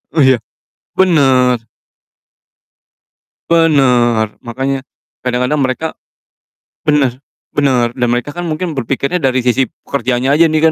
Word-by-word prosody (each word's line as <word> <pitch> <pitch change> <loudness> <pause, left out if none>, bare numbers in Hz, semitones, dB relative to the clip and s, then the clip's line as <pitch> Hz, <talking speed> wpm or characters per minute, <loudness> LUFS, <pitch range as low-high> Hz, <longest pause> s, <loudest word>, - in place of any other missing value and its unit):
oh 150 - +4
iya? 130 -3 +4 0.6
Bener. 130 -9 +3 1.9
Bener, 125 -9 +3
makanya 130 +3 -3 0.4
kadang-kadang 125 +3 0
mereka 130 +5 -1 1.0
bener 135 -4 +2 0.3
bener, 130 -5 +1
dan 120 0 -1
mereka 120 +4 -1
kan 175 +2 -5
mungkin 165 +2 -2
berpikirnya 140 +4 -2
dari 130 -4 +1
sisi 125 +1 +2
pekerjaannya 130 +1 -2
aja 160 +3 +5
nih 155 0 +3
130 Hz, 105 wpm, -15 LUFS, 125-150 Hz, 1.9 s, aja